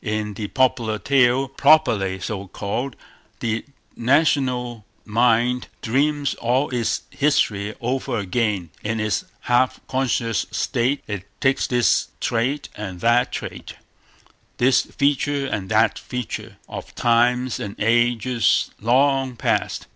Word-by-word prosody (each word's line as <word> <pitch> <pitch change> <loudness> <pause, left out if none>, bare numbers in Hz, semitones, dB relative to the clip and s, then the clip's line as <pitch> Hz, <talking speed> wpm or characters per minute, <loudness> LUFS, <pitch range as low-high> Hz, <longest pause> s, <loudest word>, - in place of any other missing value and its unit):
In 105 -1 -2
the 105 +1 -5
popular 120 -3 +1
tale, 135 +1 +3
properly 115 -10 +3
so 100 +1 -5
called, 120 +8 -4 0.4
the 115 -1 -2 0.3
national 125 -3 +1 0.2
mind 120 +2 +2 0.2
dreams 140 +4 +1
all 125 +5 0
its 120 -3 -1
history 110 -8 +1
over 125 -1 -2
again; 100 -3 -1
in 110 +1 -2
its 110 -1 -1 0.2
half 125 +1 +2
conscious 125 -4 0
state 130 +5 -1
it 105 -2 -5
takes 135 0 +2
this 120 -1 +2
trait 130 +5 -1
and 95 -4 -7
that 120 +2 +3
trait, - - -6 0.8
this 125 +1 +4
feature 140 0 0
and 105 -8 -3
that 110 +1 +3
feature, 125 -2 -6
of - - -8
times 120 +1 +2
and 100 0 -5
ages 120 +1 +2
long 135 +2 +2
past. - - -1
120 Hz, 115 wpm, -22 LUFS, 110-130 Hz, 0.8 s, this